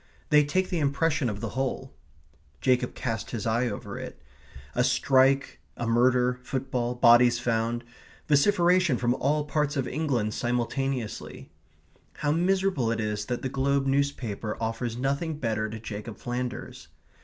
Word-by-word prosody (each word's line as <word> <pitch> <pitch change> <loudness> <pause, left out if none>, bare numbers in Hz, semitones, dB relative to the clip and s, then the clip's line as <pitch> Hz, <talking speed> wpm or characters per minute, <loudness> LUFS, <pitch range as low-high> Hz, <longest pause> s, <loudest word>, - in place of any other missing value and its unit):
They 150 0 +7
take 185 +6 0
the 175 - 0
impression 145 -1 +1
of 105 -1 -5
the 115 - -3
whole. 130 +3 -3 0.7
Jacob 125 -1 +1
cast 115 -3 -3
his 115 -2 -4
eye 115 +2 +1
over 105 - -5
it. - - -8 0.5
A 125 - +2
strike, 130 +2 +3 0.2
a 120 - -3
murder, 125 +2 +3
football, 125 -2 -2
bodies 120 0 +6
found; 120 0 -1 0.4
vociferation 175 0 +4
from 120 0 +1
all 150 +3 0
parts 150 -1 -1
of 135 - -1
England 125 -8 -1
simultaneously. 125 0 -3 0.6
How 145 -1 -1
miserable 180 -6 +1
it 115 - -1
is 105 -1 -2
that 125 +1 -3
the - - 0
Globe 135 +1 +1
newspaper 135 -6 -1
offers 115 +1 -3
nothing 140 +5 -1
better 110 -5 -1
to 110 +1 -6
Jacob 105 0 -7
Flanders! 125 0 -5
125 Hz, 145 wpm, -27 LUFS, 115-140 Hz, 0.7 s, They